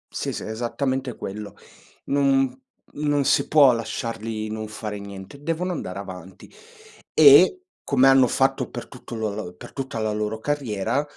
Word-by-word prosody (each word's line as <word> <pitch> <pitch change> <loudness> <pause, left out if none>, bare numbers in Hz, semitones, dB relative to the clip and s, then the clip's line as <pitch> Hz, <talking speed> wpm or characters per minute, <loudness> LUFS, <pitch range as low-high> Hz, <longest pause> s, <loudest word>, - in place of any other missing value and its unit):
Sì, - - -2
s - - -5
esattamente 125 +3 -3
quello. 100 +1 -7 0.5
Non 135 -2 +2 0.4
non 145 -2 0
si - - +3
può 145 -4 +6
lasciarli 115 -1 -4
non 110 0 -4
fare 105 -1 -6
niente, 100 +7 -10
devono 165 +4 -2
andare 95 - -5
avanti. 95 -2 -10 0.6
E, 155 - +7 0.2
come 135 -1 +4
hanno 135 -2 +6
fatto 135 +1 +1
per - - -7
tutto 120 - -10
lo 110 -3 -3
l 90 - -16
per - - -12
tutta 135 -4 -5
la 110 -1 -1
loro 105 +1 -2
carriera, 135 -1 -1
120 Hz, 150 wpm, -24 LUFS, 105-140 Hz, 0.6 s, E